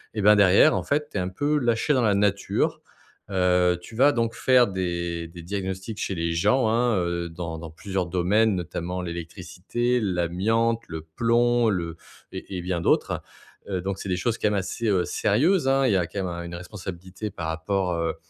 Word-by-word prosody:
et 105 - -1
ben, 105 +1 +7
derrière, 100 -2 +6
en 95 - 0
fait, 145 +10 0
tu - - -4
es - - +1
un 90 0 -2
peu 145 +10 0
lâché 120 +2 +1
dans 130 - +2
la 105 -4 +3
nature. 100 -1 0 0.5
Heu, 90 -2 +2
tu 110 - -12
vas 135 +5 +5
donc 115 -1 0
faire 125 +1 +4
des 85 -3 -3
des 85 0 -11
diagnostics 95 +3 -4
chez 95 - -2
les 85 0 -1
gens, 125 +9 +2
hein, 115 -1 +2
heu, 85 -1 -2
dans 80 -1 -6
dans 85 0 -8
plusieurs 95 +3 -3
domaines, 95 +5 +2
notamment 90 +1 -4
l'électricité, 90 +8 -3
l'amiante, 105 +5 0
le 80 -1 -6
plomb 120 +7 +2
le 85 -4 -2 0.3
et 95 - -6
et - - -3
bien 90 -1 -2
d'autres, - - +1 0.5
heu, 95 -2 -1
donc 95 +1 -3
c'est 95 - -6
des 90 - 0
choses 115 +5 -1
quand - - +2
même 105 - -1
assez 100 +4 -2 0.2
sérieuses, 165 0 +2
hein. 135 0 +3
Il - - +3
y - - +4
a 90 -2 0
quand 100 +2 -4
même 85 -1 -4
une 85 - -7
responsabilité 95 +2 -7
par 85 -5 -5
rapport, 90 +3 -1
heu, 85 -1 -1
95 Hz, 195 wpm, -25 LUFS, 85-115 Hz, 0.5 s, ben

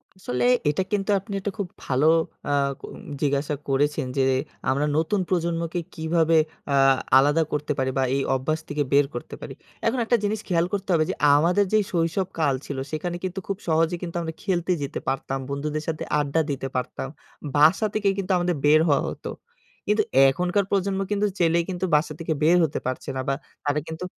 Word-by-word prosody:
আসলে 170 - -2 0.2
এটা 170 +6 +1
কিন্তু 205 0 -1
আপনি 200 +1 -9
একটা 200 +1 -3
খুব 200 - -2 0.2
ভালো 135 +4 +2 0.4
আ - - +1 0.4
উম - - -11 0.2
জিজ্ঞাসা 145 +1 0
করেছেন 145 +1 +1
যে 135 - +4 0.5
আমরা 140 +3 +1
নতুন 190 +6 +1
প্রজন্মকে 170 -1 -1 0.2
কীভাবে 160 0 +2 0.4
আ - - +4 0.4
আলাদা 145 +4 +4
করতে 150 0 -2
পারি? 130 0 0
বা 135 - +3
এই 140 - +1
অভ্যাস 155 +5 -1
থেকে 150 -1 0
বের 145 0 +6
করতে 120 - -6
পারি? - - -7 0.3
এখন 240 +2 +1
একটা 240 - +3
জিনিস 210 +1 0
খেয়াল 170 -2 +2
করতে 200 -1 -3
হবে 155 - +4
যে - - -1 0.2
আমাদের 175 +7 +3
যে 215 - +6
শৈশব 170 +2 0
কাল 145 -4 +2
ছিল 140 - -5
সেখানে 170 +3 -3
কিন্তু 185 +1 -3
খুব 195 -1 -2
সহজে 165 +1 +2
কিন্তু 175 -2 -6
আমরা 160 -1 -4
খেলতে 185 -2 0
যেতে 140 - -4
পারতাম, 135 0 -2
বন্ধুদের 150 +2 -3
সাথে 160 -1 -2 0.2
আড্ডা 145 +2 +1
দিতে 135 -1 -3
পারতাম। 130 +1 -3 0.5
বাসা 160 +9 +5
থেকে 210 -2 0
কিন্তু 195 -1 -2
আমাদের 175 -1 0
বের 150 +1 +6
হওয়া 140 - +3
হত। - - -9 0.6
কিন্তু 210 +1 +3 0.3
এখনকার 180 +6 0
প্রজন্ম 195 0 +1
কিন্তু 205 0 +1
চাইলেই 170 0 +3
কিন্তু 185 0 -2
বাসা 155 +1 +1
থেকে 160 -1 -1
বের 170 +3 +5
হতে 155 - -1
পারছে 130 - -4
না 130 - -1
বা 135 - +2 0.3
তারা 145 +1 +1
কিন্তু 160 +3 -5
165 Hz, 185 wpm, -24 LUFS, 145-185 Hz, 0.6 s, বের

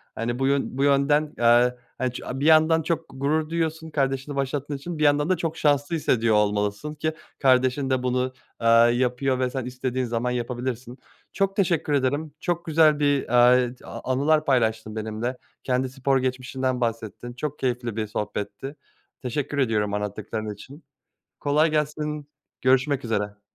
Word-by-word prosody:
Hani, 120 +2 -3
bu 135 - +2
yön 140 -1 0
bu 135 - +1
yönden, 145 +2 +3
eee, 120 +1 +4 0.2
hani 130 0 -1
ç - - -6
bir 135 +3 -3
yandan 160 +1 +5
çok 160 0 -2
gurur 150 +4 -1
diyorsun 160 -1 -2
kardeşini 135 -1 -1
başlattığın 140 +1 -2
için 165 +4 -6
bir - - +1
yandan 145 +2 +3
da 185 - +2
çok 165 -1 -3
şanslı 145 +2 +1
hissediyor 115 -8 +2
olmalısın 105 +7 0
ki 155 +1 -2 0.3
kardeşin 130 +1 +3
de 130 -1 0
bunu, 125 0 0 0.3
eee, 115 - +1 0.3
yapıyor 125 +1 0
ve 130 -1 +1
sen 130 -1 -4
istediğin 125 0 -2
zaman 120 +1 -1
yapabilirsin. 125 0 -4 0.4
Çok 195 -1 0
teşekkür 170 -6 +1
ederim 145 +2 0
çok 175 0 -2
güzel 155 -2 +4
bir, 145 -1 +3
eee, 125 +1 +4
a - - -8
anılar 150 +4 +2
paylaştın 110 -4 +1
benimle 110 +3 -3 0.3
kendi 130 0 0
spor 135 +1 +1
geçmişinden 130 0 -2
bahsettin, 115 +1 -3
çok 150 +3 -5
keyifli 120 -3 -2
bir 110 -1 -2
sohbetti. 105 +6 -5 0.5
Teşekkür 140 +3 -3
ediyorum 110 -6 +1
anlattıkların 105 +1 -4
için. 135 +10 -13 0.6
Kolay 150 +2 +2
gelsin, 150 -1 -2 0.3
görüşmek 130 +1 +2
üzere. 105 -2 -2
130 Hz, 155 wpm, -24 LUFS, 120-150 Hz, 0.6 s, yandan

